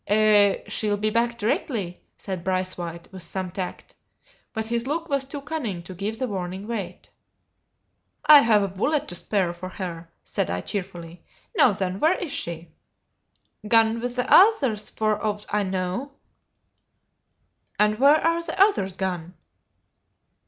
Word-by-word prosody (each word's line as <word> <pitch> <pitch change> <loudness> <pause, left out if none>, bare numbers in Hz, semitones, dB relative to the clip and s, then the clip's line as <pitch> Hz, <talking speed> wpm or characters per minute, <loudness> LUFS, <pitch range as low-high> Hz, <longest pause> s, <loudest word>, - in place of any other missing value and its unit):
"Eh, 210 -1 +4
she'll 210 -1 0
be 215 +1 0
back 235 +1 +1
directly!" 210 - -2 0.2
said 185 -4 -5
Braithwaite, 185 -2 -3
with 190 -1 -9
some 185 0 -4
tact; 185 0 -6 0.6
but 220 0 -3
his 235 +2 -2
look 330 +3 -2
was 275 -1 0
too 280 +1 -7
cunning 260 - -4
to 185 - -9
give 200 +5 -4
the 255 +1 -2
warning 190 -1 -5
weight. 230 -4 -6 1.1
"I've 230 -9 +7
a - - 0
bullet 280 +11 -1
to - - -6
spare 180 0 -1
for 185 +1 -8
her," 170 -3 -6
said - - -2
I, 90 +1 -2
cheerfully; 175 - -6 0.3
"now, 255 - +6
then, 190 -1 -3
where 325 +4 +4
is 330 - -5
she?" 170 - -4 1.0
"Gone 225 +1 +3
wi' 245 - 0
the 245 0 -2
oothers, 275 - +5
for 215 -1 -1
owt 210 -1 -2
I 210 - +2
knaw." 190 +6 -2 1.7
"And 210 +1 +2
where 280 +3 +7
are 335 +1 +1
the 335 +2 -6
others 375 - +3
gone?" 180 -2 -3
210 Hz, 145 wpm, -24 LUFS, 185-240 Hz, 1.7 s, I've